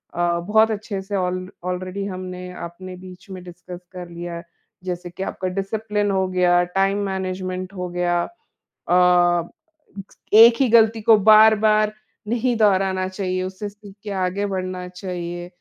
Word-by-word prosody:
अ, 175 0 +1
बहुत 220 +5 +3
अच्छे 205 -2 -4
से 200 +1 -5
ऑल 185 0 -2 0.2
ऑलरेडी 185 +2 -4
हमने 185 -1 -6
अपने 180 +2 -8
बीच 185 +2 -13
में 185 -1 -8
डिस्कस 180 0 -10
कर 180 -2 -8
लिया। 170 0 -6 0.4
जैसे 180 -1 -5
कि 190 +2 -6
आपका 185 - -4
डिसिप्लिन 205 +2 -2
हो 190 -1 +1
गया, 180 -1 +3
टाइम 195 +3 0
मैनेजमेंट 185 0 -4
हो 180 -1 -4
गया। 175 0 0 0.5
अ, 175 -1 +2 0.8
1 230 +2 +9
ही 260 - +4
गलती 225 -1 +4
को 220 0 +6
बार-बार 215 0 +5 0.3
नहीं 240 +2 0
दोहराना 190 -3 +2
चाहिए 185 -1 -3
उससे 190 +2 -5
सीख 200 -1 -15
के 210 - -6
आगे 195 +3 -2
बढ़ना 185 -2 -4
चाहिए। 175 -1 -6
185 Hz, 145 wpm, -22 LUFS, 180-205 Hz, 0.8 s, 1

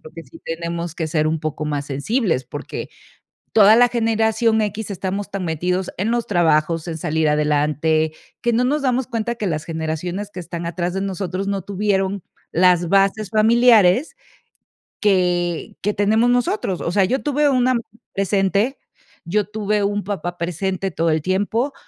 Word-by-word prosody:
creo 155 - -12
que 165 - -8
sí 130 - -15
tenemos 170 0 -4
que 160 -2 -2
ser 155 0 0
un 160 +1 0
poco 155 0 -4
más 145 -1 -2
sensibles, 145 - -1
porque 145 +2 -6 0.6
toda 215 0 +7
la 245 +1 +6
generación 225 -1 +1
equis 210 0 -3
estamos 195 +2 -3
tan 195 -2 -3
metidos 180 +3 -1
en 215 +5 -1
los 240 -1 -1
trabajos, 165 -2 +2
en 160 -1 -4
salir 155 0 0
adelante, 150 +1 +1 0.3
que 240 - +1
no 235 +2 +2
nos 290 +4 +1
damos 255 -1 0
cuenta 235 0 -2
que 215 -4 -3
las 155 -2 -2
generaciones 165 +5 -4
que - - -10
están 170 -1 -5
atrás 175 +1 -2
de 195 - -1
nosotros 195 0 -3
no 195 -2 -1
tuvieron 200 -1 -1 0.3
las 175 0 +3
bases 195 +2 +2
familiares 230 - +4 0.9
que 180 -4 +1
que 210 +1 0
tenemos 220 +4 +3
nosotros. 220 -6 0
O 170 - -2
sea, 195 +1 +3
yo 260 +8 -1
tuve 290 0 +2
una 255 -1 +3
mamá 235 -2 -1 0.3
presente, 200 +5 +1 0.5
yo 205 +4 0
tuve 210 -1 -1
un 205 0 -1
papá 175 -3 -4
presente 185 +3 -2
todo 165 0 0
el 155 -1 +1
tiempo 205 - 0
195 Hz, 165 wpm, -20 LUFS, 165-215 Hz, 0.9 s, toda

